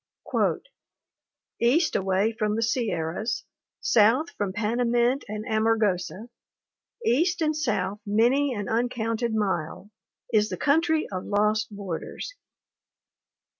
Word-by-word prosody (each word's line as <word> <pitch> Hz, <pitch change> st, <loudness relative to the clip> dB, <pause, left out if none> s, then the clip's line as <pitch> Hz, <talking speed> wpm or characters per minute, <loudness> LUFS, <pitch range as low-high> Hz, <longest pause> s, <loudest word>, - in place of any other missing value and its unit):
"East 300 Hz, +8 st, +3 dB
away 195 Hz, +3 st, +1 dB
from 215 Hz, -1 st, -1 dB
the 225 Hz, -, 0 dB
Sierras, 220 Hz, -2 st, -1 dB, 0.4 s
south 240 Hz, +9 st, +4 dB
from 205 Hz, -2 st, -3 dB
Pana 220 Hz, +4 st, 0 dB
mint 240 Hz, +3 st, +2 dB
and 215 Hz, +1 st, -5 dB
Amargosa, 215 Hz, -2 st, 0 dB, 0.8 s
east 345 Hz, -, +2 dB
and 310 Hz, 0 st, +1 dB
south 210 Hz, -9 st, -1 dB
many 240 Hz, +7 st, +2 dB
an 205 Hz, -5 st, -3 dB
uncounted 230 Hz, -1 st, -1 dB
mile, 195 Hz, -1 st, -2 dB, 0.4 s
is 215 Hz, -1 st, +3 dB
the -, -, -4 dB
Country 320 Hz, +2 st, +2 dB
of 185 Hz, -1 st, -4 dB
Lost 210 Hz, +2 st, +1 dB
Borders. 200 Hz, -, -6 dB
220 Hz, 105 wpm, -26 LUFS, 205-245 Hz, 0.8 s, south